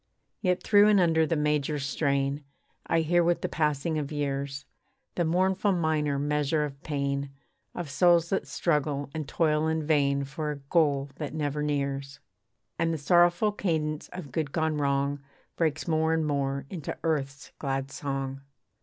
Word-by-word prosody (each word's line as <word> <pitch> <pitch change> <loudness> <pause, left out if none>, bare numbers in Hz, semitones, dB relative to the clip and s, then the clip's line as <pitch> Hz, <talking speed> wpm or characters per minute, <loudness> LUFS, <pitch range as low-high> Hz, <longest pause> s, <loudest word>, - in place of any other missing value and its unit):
Yet 180 -2 +1
through 205 -1 +6
and 210 -2 +5
under 160 -3 +3
the 165 - +1
major 150 0 0
strain, 140 0 0 0.4
I 165 - +2
hear 175 +2 +3
with 175 0 +1
the - - -1
passing 155 0 0
of 145 -1 -4
years, 140 -2 -3 0.5
The 175 - 0
mournful 190 +4 +2
minor 155 -4 +1
measure 150 +1 +1
of 140 -1 -9
pain, 140 -1 -2 0.5
Of 175 -3 -4
souls 170 +3 +4
that 190 -7 0
struggle 145 -2 -1
and 155 -3 -4
toil 155 -1 +1
in 160 -1 -1
vain 140 -2 +2
For 150 +3 -4
a 150 - -2 0.2
goal 145 -5 +2
that 150 -1 -5
never 150 -1 -1
nears. 140 -1 -2 0.6
And 165 0 +2
the 165 - -1
sorrowful 175 +7 +4
cadence 155 -7 -2
of 175 -7 -8
good 145 0 -2
gone 160 -1 0
wrong, 140 0 0 0.4
Breaks 155 -4 0
more 160 0 +2
and 160 -1 0
more 140 -2 -1
into 165 -6 -5
earth's 140 -4 -2
glad 135 -1 -2
song. 135 -1 -4
150 Hz, 160 wpm, -28 LUFS, 140-165 Hz, 0.6 s, through